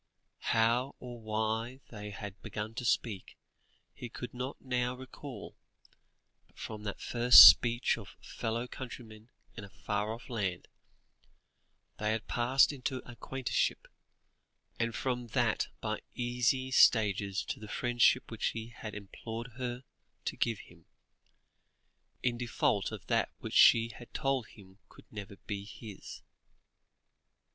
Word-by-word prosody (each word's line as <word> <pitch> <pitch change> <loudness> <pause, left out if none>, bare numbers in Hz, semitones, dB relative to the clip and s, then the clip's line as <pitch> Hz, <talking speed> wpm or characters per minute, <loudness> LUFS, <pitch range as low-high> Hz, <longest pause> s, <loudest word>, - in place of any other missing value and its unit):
How 120 +4 +2
or 120 -1 -8
why 110 +3 -2
they 105 -2 -7
had 100 -1 -8
begun 105 +1 -5
to 125 +2 -5
speak, 110 -5 -1 0.6
he 120 - -8
could 125 +2 -7
not 125 +2 -5
now 125 -1 -1
recall, 130 -2 -9 0.9
but - - -30
from 110 -1 -7
that 100 - -4
first 120 +1 +10
speech 120 +1 +5
of - - -12
fellow 115 +2 -4
countrymen 115 -3 -9 0.3
in 110 - -7
a 100 - -10
far 105 +2 -3
off 115 +2 -8
land, 100 -8 -3 1.3
they 105 +1 +1
had 110 0 -3
passed 130 +4 +3
into 130 -1 -4
acquaintanceship, 125 +2 -2 0.9
and 115 0 -1
from 125 -2 -2
that 120 -4 +2
by - - -3
easy 125 +2 0
stages 100 -5 +4
to - - -4
the 110 - -9
friendship 120 +3 +2
which 115 - -1
he 115 0 -4
had 110 -2 -8
implored 115 +4 -7
her 125 0 -4 0.4
to - - -2
give 115 -3 -1
him, - - -18 1.4
in 120 -1 0
default 120 -2 0
of - - -8
that - - +1
which - - -7
she 115 0 +7
had 115 +2 -12
told 135 -5 0
him 95 -1 -17
could - - -17
never 100 -2 -8
be 100 -1 -4
his. 105 -1 -10
115 Hz, 135 wpm, -32 LUFS, 110-125 Hz, 1.4 s, first